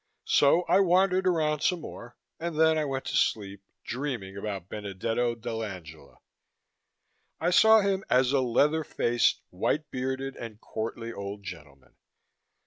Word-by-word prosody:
So 155 +5 +4
I 190 - +3
wandered 185 0 +3
around 155 -4 +1
some 180 -3 +1
more, 120 -3 -10 0.2
and 165 -2 -4
then 160 0 +5
I 155 -1 0
went 135 -1 -3
to - - -3
sleep, 100 -7 0 0.2
dreaming 120 -7 -4
about 100 -3 -5
Benedetto 110 +4 -2
dell'Angela. 95 -10 -7 1.2
I 175 +2 +1
saw 220 +4 +7
him 195 -1 0
as 125 0 +3
a 140 -1 +3
leather 145 +6 +2
faced, 120 -4 +1
white 145 +11 -1
bearded 130 +1 -3
and 110 -3 -9
courtly 115 +1 -5
old 100 0 -7
gentleman. 75 -8 -11
125 Hz, 135 wpm, -28 LUFS, 105-155 Hz, 1.2 s, saw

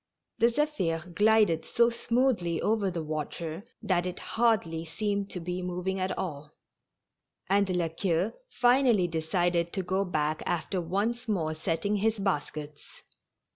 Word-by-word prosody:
The 230 - +6
Ztphir 180 - -1
glided 210 -5 +4
so 235 0 +3
smoothly 230 -8 +1
over 210 -2 +1
the 170 -3 -3
water 155 +3 -4 0.2
that 180 -1 +1
it 180 - -4
hardl}^ 190 -9 0
seemed 200 +3 -2
to 180 - -5
be 180 +2 -3
moving 180 +1 -2
at 185 0 -1
all, 150 -4 -4 1.0
and 200 0 +3
La 180 -2 +1
Queue 170 +4 0 0.2
finally 245 -6 +4
decided 170 +1 0
to 190 - -1
go 190 +2 0
back 155 -4 -1
after 175 +2 -1
once 215 +8 -1
more 165 -7 0
setting 165 +6 -1
his 220 +2 +1
baskets. 150 -6 -4
180 Hz, 135 wpm, -29 LUFS, 165-210 Hz, 1.0 s, The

